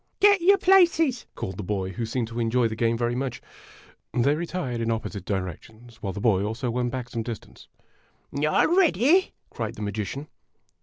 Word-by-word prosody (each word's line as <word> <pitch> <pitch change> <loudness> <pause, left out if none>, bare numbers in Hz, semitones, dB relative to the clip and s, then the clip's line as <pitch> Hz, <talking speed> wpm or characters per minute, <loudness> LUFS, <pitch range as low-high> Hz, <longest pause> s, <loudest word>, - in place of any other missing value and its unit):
" - - -47
Get 405 -2 +6
your 395 +3 +6
places! 340 -8 +4
called 95 -1 -5
the 105 - -4
boy, 95 -1 -2
who 115 +5 -4
seemed 115 0 -2
to 115 +1 -5
enjoy 120 +1 +2
the 110 - -5
game 115 0 +1
very 120 0 0
much. 125 -1 -3 0.8
They 130 +4 +3
retired 150 -7 -3
in 115 - -1
opposite 110 -4 -3
directions, 110 +5 -6
while 95 - -2
the 100 - -6
boy 100 -3 +3
also 110 +4 -2
went 120 0 -1
back 125 -1 -5
some 115 - -3
distance. 115 -1 -8 0.7
"All 150 +2 +3
ready?" 345 - +4 0.2
cried 115 0 -4
the 105 - -6
magician. 110 +8 -4
120 Hz, 185 wpm, -25 LUFS, 110-150 Hz, 0.8 s, Get